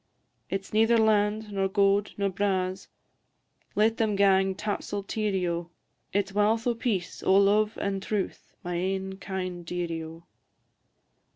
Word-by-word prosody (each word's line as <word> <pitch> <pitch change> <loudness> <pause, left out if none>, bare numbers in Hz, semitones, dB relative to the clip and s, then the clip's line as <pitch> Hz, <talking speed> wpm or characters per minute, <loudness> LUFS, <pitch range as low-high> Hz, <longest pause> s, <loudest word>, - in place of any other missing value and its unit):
Its 195 +1 -4
neither 225 +2 +4
land, 215 -1 +2
nor 195 -1 +1
gowd, 200 +1 +2
nor 200 -1 +1
braws 190 -1 -1 0.9
Let 220 +2 +3
them 215 -2 +1
gang 195 -1 +3
tapsle 205 0 -3
teerie, 200 -3 -1
O! 170 0 -3 0.4
It 200 0 0
's - - -14
walth 215 +2 +2
o' 245 - +2
peace, 210 -7 -2
o' 190 - +3
love, 210 +2 +4
and 195 -1 -2
truth, 205 -1 -4
My 175 - -3
ain 190 +2 -2
kind 185 -3 -4
dearie, 170 -1 -3
O! 165 +1 -10
195 Hz, 145 wpm, -27 LUFS, 190-210 Hz, 0.9 s, neither